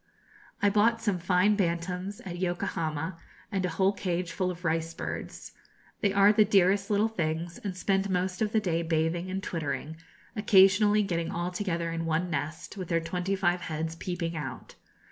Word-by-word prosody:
I 205 - +5
bought 225 +3 +3
some 205 -5 0
fine 180 +4 +3
bantams 180 +1 -2
at 175 -2 -7
Yokohama, 170 -3 -2 0.3
and 195 -2 -1
a 180 - 0
whole 190 +4 +2
cage 180 -3 -2
full 185 +1 -1
of 180 0 -7
rice 165 0 -1
birds. - - -6 0.5
They 200 - +2
are 200 +1 +6
the 215 0 +6
dearest 195 -1 +3
little 210 +1 +3
things, 170 -4 -3
and 190 -3 -5
spend 195 +1 +1
most 185 +1 -1
of 215 -1 +1
the 220 - +3
day 170 -5 0
bathing 165 +2 0
and 190 +1 -3
twittering, 160 -2 -3 0.4
occasionally 205 0 +5
getting 170 -4 -2
all 175 +1 -2
together 170 -3 -2
into 165 0 -3
one 165 +2 0
nest, 155 +6 -4
with 185 -2 -5
their 165 0 +1
twenty 180 +4 -2
five 180 -2 +1
heads 160 +1 -3
peeping 170 -1 -3
out. 135 -5 -6
180 Hz, 175 wpm, -28 LUFS, 165-195 Hz, 0.5 s, are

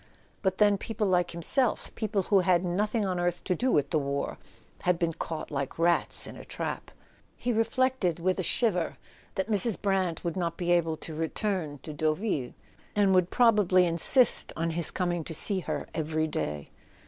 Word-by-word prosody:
But 190 -2 0
then 205 -2 +4
people 220 0 -3
like 180 -2 +2
himself—people 215 - 0
who 200 +1 +3
had 180 -1 +2
nothing 210 +5 0
on 185 -2 -1
earth 175 0 -1
to 180 - 0
do 255 +5 0
with 145 - +1
the 155 - +2
war—had 140 +5 -4
been 170 -1 -1
caught 160 -1 -6
like 140 -2 -3
rats 170 +1 +2
in - - -9
a - - -10
trap! - - -5 0.5
He 245 0 -1
re¬ - - -2
flected 255 -10 0
with 185 +2 0
a - - +2
shiver 185 -3 0 0.4
that 190 - -1
Mrs. 215 0 +2
Brant 190 -4 -1
would 170 -2 -2
not 170 -3 -2
be 175 -1 -1
able 165 -2 +2
to 160 - -8
return 160 -1 -2
to 155 - -7
Deauville, 155 - -1 0.4
and 200 -2 +3
would 185 -1 +3
probably 205 -7 +4
insist 175 - +4
on 165 +1 -1
his 165 -1 +1
coming 175 -3 -1
to 160 - -6
see 195 +4 +2
her - - -4
every 155 0 -1
day. 75 - -4
180 Hz, 180 wpm, -28 LUFS, 165-205 Hz, 0.5 s, then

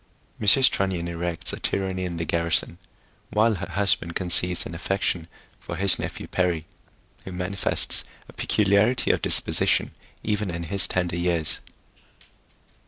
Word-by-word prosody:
Mrs. 130 +6 +6
Trunnion 95 -3 -1
erects 85 0 -3
a - - -6
Tyranny 95 -1 -2
in 85 -2 -5
the 85 - -3
Garrison, 85 +1 -1 0.5
while 110 +2 +2
her 95 - -6
Husband 95 -4 0
conceives 90 -1 +3
an - - -8
affection 85 -1 -2 0.3
for - - -7
his 100 -1 +2
Nephew - - -6
Perry, 90 -4 -1 0.6
who 95 - -9
manifests 90 +2 +1 0.2
a - - -15
peculiarity 105 +4 +1
of - - -1
disposition - - +2 0.3
even 105 -2 -2
in 85 0 -5
his 95 +3 +1
tender 90 -2 -2
years. 85 -3 +1
90 Hz, 135 wpm, -24 LUFS, 85-100 Hz, 0.6 s, Mrs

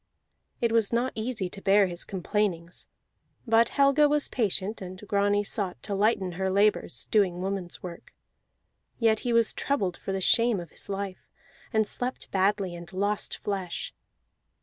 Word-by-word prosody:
It 235 -1 +2
was 225 -3 +2
not 240 +2 +1
easy 220 -3 -2
to 195 - -7
bear 200 +1 +5
his 175 -2 -1
complainings; 185 -2 -2 0.6
but 230 0 +4
Helga 280 +1 +4
was 295 0 +2
patient, 210 -2 0
and 185 0 -7
Grani 205 0 +2
sought 195 -3 -3
to 205 - -3
lighten 195 -2 +1
her 190 +2 -2
labors, 200 +2 +1
doing 190 -5 +3
woman's 190 -2 -4
work. 175 -2 -9 0.9
Yet 225 -2 +3
he 245 - -2
was 230 -1 +4
troubled 195 -11 -1
for - - -5
the 195 - -1
shame 230 +2 +3
of 170 -3 -9
his - - -9
life, 195 -1 -5 0.4
and 220 -2 +2
slept 250 +4 -4
badly, 195 -1 +1
and 170 0 -10
lost 200 +2 -1
flesh. 190 -4 -4
200 Hz, 155 wpm, -27 LUFS, 185-225 Hz, 0.9 s, bear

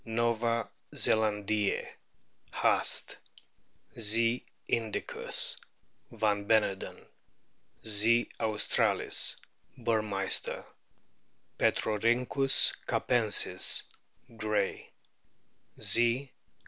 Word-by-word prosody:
nova 115 0 -1 0.3
zelandiez, 105 -1 0 0.7
Haast; - - +1 0.8
Z. 115 +2 +1 0.2
indie 110 -2 -2
us, - - +2 0.6
van 105 -2 -1
Beneden; 105 -3 0 0.8
Z. 110 +2 +3
australis, 110 -1 +1 0.4
Burmeister; 110 -5 0 0.9
Petrorkynchus 120 +5 +2
capensis, 115 -4 +2 0.6
Gray; 105 -2 -2 0.9
Z. 120 +3 +2
110 Hz, 55 wpm, -29 LUFS, 105-115 Hz, 0.9 s, Z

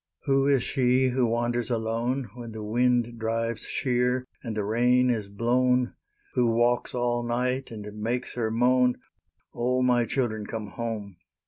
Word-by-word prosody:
Who 135 -1 +3
is 135 -3 +3
she 130 0 +2
who 125 -1 +1
wanders 120 +1 0
alone, 115 +1 -1
When 120 -2 -8
the 110 -1 -6
wind 120 +1 +1
drives 115 0 -2
sheer 125 -1 0 0.2
and 115 -4 -5
the 105 - 0
rain 125 +4 +3
is 110 -4 -2
blown? 125 +4 +1 0.4
Who 120 - +2
walks 120 +2 +1
all 120 -1 0
night 125 +2 -1
and 105 -3 -8 0.2
makes 120 +3 -2
her 115 -3 -1
moan, 125 +2 +3 0.6
"O, 125 +2 0
my 120 -1 +3
children, 110 -3 -2
come 110 -2 -5
home!" 110 -5 -5
120 Hz, 150 wpm, -27 LUFS, 115-125 Hz, 0.6 s, Who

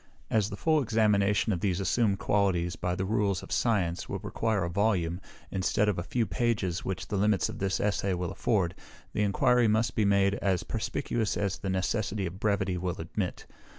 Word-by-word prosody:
As 105 -2 +2
the 100 - -6
full 155 -2 +2
examination 105 -3 +2
of 90 - -2
these 95 -1 0
assumed 100 +1 +1
qualities, 90 -5 +1
by 90 0 -2
the 95 - -2
rules 100 -3 0
of - - -11
science, 95 -8 0
would - - -4
require 110 -4 0
a - - -1
volume, 90 -2 0 0.3
instead 95 +2 +1
of 100 -4 +1
a - - -2
few 115 +5 0
pages, 95 -3 -1
which 95 -1 -4
the 100 - -1
limits 105 0 +2
of - - -7
this 95 -1 0
Essay 100 -2 0
will 90 -1 -3
afford, 95 -7 0 0.4
the - - 0
enquiry 115 +4 +3
must 110 +2 +2
be 110 - +1
made 100 -1 +3
as 95 -3 +1
perspicuous 115 -3 -2
as 100 -1 -1
the 95 - -4
necessity 95 +2 -1
of 90 +2 -6
brevity 100 -4 0
will 90 -1 -2
admit. 90 +3 -4
100 Hz, 190 wpm, -29 LUFS, 90-105 Hz, 0.4 s, enquiry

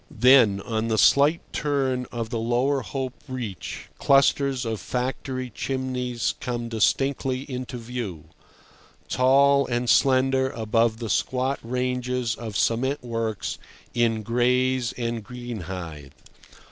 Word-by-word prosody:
Then, 120 -5 +5
on 110 +1 -2
the 110 -1 0
slight 145 +8 +5
turn 135 -4 0
of 115 -1 -4
the 115 - -1
Lower 125 +4 +1
Hope 130 +4 -4
Reach, 120 -8 -6
clusters 135 -1 +3
of 110 -2 -2
factory 130 0 -3
chimneys 125 -2 -2
come 120 -1 -3
distinctly 130 +3 +1
into 130 -2 -6
view, 115 -10 -6 0.8
tall 140 +2 +4
and 120 0 -1
slender 130 +1 +3
above 115 -1 +1
the 115 -1 -5
squat 130 +7 0
ranges 125 0 -1
of 110 -4 -5
cement 130 +5 0
works 115 -3 -3 0.3
in 115 -2 +1
Grays 125 +2 +1
and 115 -2 -3
Greenhithe. 95 - -7
125 Hz, 115 wpm, -25 LUFS, 115-130 Hz, 0.8 s, Then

